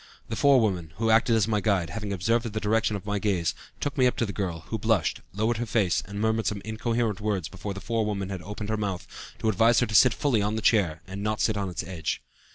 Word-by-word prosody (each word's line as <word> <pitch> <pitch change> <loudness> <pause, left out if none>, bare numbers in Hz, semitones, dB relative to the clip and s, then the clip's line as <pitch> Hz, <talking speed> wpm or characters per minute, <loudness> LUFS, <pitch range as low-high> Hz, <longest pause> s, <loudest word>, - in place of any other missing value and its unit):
The 115 - -2
forewoman, 110 - +3
who 115 0 +1
acted 115 +1 +4
as 110 -2 +2
my 105 -2 +1
guide, 95 -7 +1
having 105 +1 -4
observed 115 +5 0
the 110 - -2
direction 110 +1 +1
of 100 - -6
my 105 0 -1
gaze, 95 -6 0 0.3
took 145 0 -3
me 130 - +6
up 125 - 0
to 115 - +1
the 100 - -5
girl, 90 -5 -3
who - - -2
blushed, - - +1
lowered 110 +4 0
her 120 +1 -3
face, 105 -6 +2
and 100 0 -6
murmured 110 0 +1
some 105 - -1
incoherent 110 -1 -1
words 100 -6 -1
before 100 +1 -6
the 100 - -7
forewoman 105 -3 -1
had 95 -3 -5
opened 105 +2 -6
her 110 - 0
mouth, 100 -4 -3 0.3
to - - -2
advise 115 +2 +4
her 125 - +3
to 110 - -7
sit 120 +3 +6
fully 130 -7 +1
on 105 +2 0
the 110 - -2
chair, 95 -9 +2
and 100 +1 -7
not 105 +1 +1
on 100 -2 -2
its 90 - -4
edge. 85 -5 -3
105 Hz, 245 wpm, -27 LUFS, 100-115 Hz, 0.3 s, me